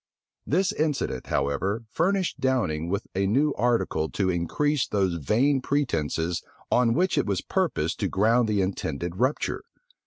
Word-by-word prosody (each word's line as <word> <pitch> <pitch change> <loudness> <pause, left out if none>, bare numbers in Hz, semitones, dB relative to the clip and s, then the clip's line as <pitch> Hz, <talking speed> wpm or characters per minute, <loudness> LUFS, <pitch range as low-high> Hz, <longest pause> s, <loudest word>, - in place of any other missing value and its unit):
This 185 +5 +2
incident, 145 - -1
however, 90 +11 -1
furnished 190 +1 0
Downing 85 -12 0
with 100 +3 -2
a 95 +1 +1
new 140 +8 +2
article 115 -9 0
to 95 -2 0
increase 130 - 0
those 95 -6 0
vain 135 - +2
pretences 85 - -1 0.3
on 120 -2 +3
which 180 -2 +2
it 140 - 0
was 100 -3 0
purposed - - -1
to - - 0
ground 110 +4 +2
the 105 -2 +2
intended 85 -2 -3
rupture. 130 +6 0
110 Hz, 145 wpm, -26 LUFS, 90-140 Hz, 0.3 s, on